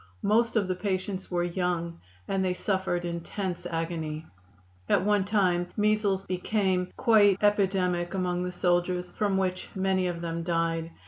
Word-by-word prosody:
Most 230 +4 +2
of 205 -4 +2
the 185 - 0
patients 190 0 -3
were 175 -1 0
young, 175 -1 -2 0.3
and 195 -1 0
they 180 -1 0
suffered 190 -3 -1
intense 175 +1 -4
agony. 165 -2 -3 0.6
At - - +3
one 205 -2 +3
time 185 -4 +2
measles 210 -2 +2
became 185 -1 0
quite 210 -5 +5
epidemic 190 -4 +1
among 180 -1 -1
the 180 - -3
soldiers, 180 0 0
from 200 -2 0
which 185 -1 -1
many 190 -1 +1
of 170 -1 -4
them 170 0 -3
died. 165 -1 -1
185 Hz, 145 wpm, -28 LUFS, 175-195 Hz, 0.6 s, quite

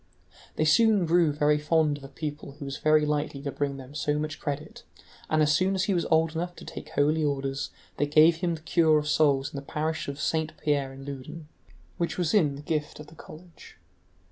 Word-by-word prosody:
They 155 - +1
soon 205 +4 +4
grew 170 -1 +3
very 150 0 +2
fond 150 -1 +1
of - - -16
a - - -8
pupil 145 0 -6
who 145 0 -9
was 135 0 -6
likely 150 -2 +2
to 140 - -3
bring 140 -1 -2
them 135 +1 -11
so 150 0 -1
much 155 0 -4
credit, 145 +1 -5 0.5
and 155 0 +3
as 150 - +3
soon 190 +3 +1
as 190 - 0
he 195 - +1
was 175 - 0
old 160 0 +3
enough 175 +2 -3
to - - -12
take - - -8
holy 155 +2 +1
orders 135 -1 -2 0.3
they 145 - +1
gave 155 +3 +5
him 170 -1 -1
the 155 - -11
cure 160 -1 +3
of 150 0 -2
souls 145 -2 +2
in - - -5
the - - -4
parish 155 +3 -3
of 140 0 -5
Saint 160 0 -1
Pierre 140 -3 0
in 135 0 -11
Loudun, 140 +3 -8 0.5
which 170 - -1
was 175 -3 0
in 150 -9 +3
the 145 - -10
gift 150 -1 -3
of 150 - -9
the 150 - -16
college. 165 +2 -14
150 Hz, 220 wpm, -27 LUFS, 145-160 Hz, 0.5 s, gave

